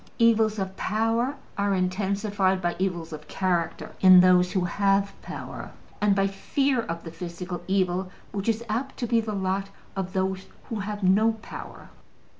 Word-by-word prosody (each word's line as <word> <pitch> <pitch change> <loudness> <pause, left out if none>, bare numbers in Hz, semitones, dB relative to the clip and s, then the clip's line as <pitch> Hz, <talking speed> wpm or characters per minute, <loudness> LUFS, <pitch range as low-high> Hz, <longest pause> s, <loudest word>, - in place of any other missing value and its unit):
Evils 225 -2 +4
of 190 -1 -3
power 225 +6 0 0.2
are 200 -1 +2
intensified 190 +1 0
by 175 -1 -1
evils 175 -4 -2
of 150 0 -9
character 180 -3 -1
in 185 -1 +9
those 180 0 +5
who 190 - +2
have 200 +1 +2
power, - - -7 0.3
and 205 -1 +4
by 195 0 +3
fear 255 +6 0
of 170 -6 -5
the 165 - -7
physical 175 +1 -6
evil 185 -1 +1 0.2
which 200 +2 -2
is 225 +1 0
apt 235 +5 -2
to 245 - -2
be 230 0 +2
the 215 -1 -4
lot 195 0 -1 0.3
of 190 -1 -3
those 190 0 -1 0.2
who 225 - -3
have 205 0 -4
no 210 +5 +4
power. - - -9
195 Hz, 165 wpm, -26 LUFS, 185-215 Hz, 0.3 s, in